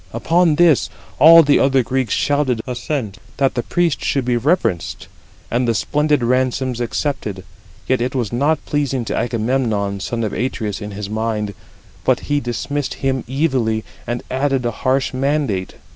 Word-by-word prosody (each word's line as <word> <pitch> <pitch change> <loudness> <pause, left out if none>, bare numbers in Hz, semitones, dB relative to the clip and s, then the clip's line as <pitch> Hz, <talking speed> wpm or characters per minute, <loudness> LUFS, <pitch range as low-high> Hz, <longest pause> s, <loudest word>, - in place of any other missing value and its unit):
Upon 170 -2 +2
this 165 -3 +4 0.3
all 165 +4 +9
the 145 -1 +4
other 135 -1 +3
Greeks 130 -2 -1
shouted 145 -5 +1
assent, 120 -4 -4 0.2
that 135 -1 +2
the 120 - -1
priest 175 +3 0
should 135 -3 0
be 125 -1 +1
reverenced, 120 - 0 0.4
and 120 +1 +1
the 115 - +1
splendid 150 +3 +1
ransoms 130 0 0
accepted: 115 -6 -3 0.4
yet 130 -2 +1
it 125 +2 -2
was 120 -4 -2
not 145 +6 +1
pleasing 135 -4 -1
to - - -2
Agamemnon, 110 -4 -1
son 115 +4 -3
of 105 - -2
Atreus, 110 -4 -3
in 105 - -5
his 100 0 -6
mind; 110 -1 -2 0.5
but - - +2
he 145 0 0
dismissed 140 +3 -3
him 130 -2 0
evilly, 130 -6 0 0.2
and 120 +1 -3
added 135 -1 0
a 120 - +1
harsh 130 +4 0
mandate. 135 -8 -1
130 Hz, 160 wpm, -19 LUFS, 115-145 Hz, 0.5 s, all